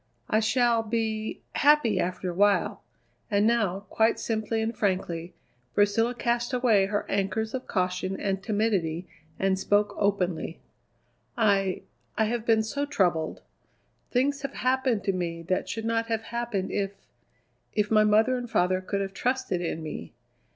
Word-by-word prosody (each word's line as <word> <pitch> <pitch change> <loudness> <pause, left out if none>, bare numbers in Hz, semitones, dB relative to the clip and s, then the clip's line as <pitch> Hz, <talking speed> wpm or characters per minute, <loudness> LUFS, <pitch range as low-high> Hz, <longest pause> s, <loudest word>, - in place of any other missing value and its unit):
"I 215 - +4
shall 235 +1 +3
be 220 -1 -2
happy 280 -9 +4
after 180 0 -2
a - - -7
while." 200 +2 +2 0.5
And 205 -1 +3
now, 215 -5 +2
quite 225 +1 +2
simply 220 0 -1
and 220 +1 -1
frankly, 180 -4 -2 0.4
Priscilla 225 +4 +3
cast 240 +2 -1
away 225 -6 +3
her 205 +1 -1
anchors 200 +3 -1
of 260 -1 -4
caution 185 0 -1
and 195 -1 -1
timidity 190 -6 0 0.3
and 190 -1 +1
spoke 205 +1 +2
openly: 185 -5 0 0.8
"I 200 -4 +2 0.3
I 220 - +3
have 230 +1 -2
been 220 -1 +4
so 280 +6 -2
troubled. 175 - 0 0.7
Things 275 +3 +1
have 275 - -5
happened 255 -5 +1
to 195 - +1
me 170 -2 -3
that 185 +2 -1
should 225 +3 -4
not 230 0 0
have 225 -1 -1
happened 235 -5 -3
if 200 -1 -1 0.8
if 210 0 +1
my 215 -1 +6
mother 220 +4 +4
and 240 -1 -6
father 185 -2 +2
could 200 +1 -2
have 195 0 -4
trusted 245 -8 -1
in 165 -2 -3
me. 85 - -7
210 Hz, 150 wpm, -27 LUFS, 190-230 Hz, 0.8 s, my